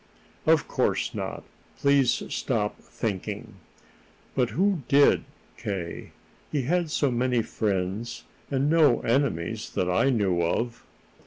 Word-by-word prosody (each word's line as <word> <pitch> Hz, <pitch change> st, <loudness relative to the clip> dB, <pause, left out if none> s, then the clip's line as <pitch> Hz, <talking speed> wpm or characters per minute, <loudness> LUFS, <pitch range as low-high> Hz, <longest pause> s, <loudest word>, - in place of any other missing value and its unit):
"Of -, -, +4 dB
course -, -, 0 dB
not. -, -, -4 dB, 0.3 s
Please 140 Hz, -3 st, +3 dB
stop 105 Hz, -5 st, -1 dB
thinking." 105 Hz, +1 st, -4 dB, 0.8 s
"But 125 Hz, -2 st, +1 dB
who 190 Hz, +2 st, +1 dB
did, 140 Hz, +1 st, +5 dB, 0.3 s
K.? 95 Hz, -6 st, -5 dB, 0.4 s
He 145 Hz, -3 st, 0 dB
had 170 Hz, +4 st, +1 dB
so 145 Hz, -3 st, +1 dB
many 125 Hz, -1 st, +1 dB
friends, 100 Hz, +2 st, -2 dB, 0.3 s
and 140 Hz, 0 st, +1 dB
no 155 Hz, -6 st, +4 dB
enemies 115 Hz, -, 0 dB
that 90 Hz, 0 st, +1 dB
I 115 Hz, +9 st, +3 dB
knew 100 Hz, -8 st, +2 dB
of." 115 Hz, +8 st, -1 dB
120 Hz, 115 wpm, -26 LUFS, 100-140 Hz, 0.8 s, did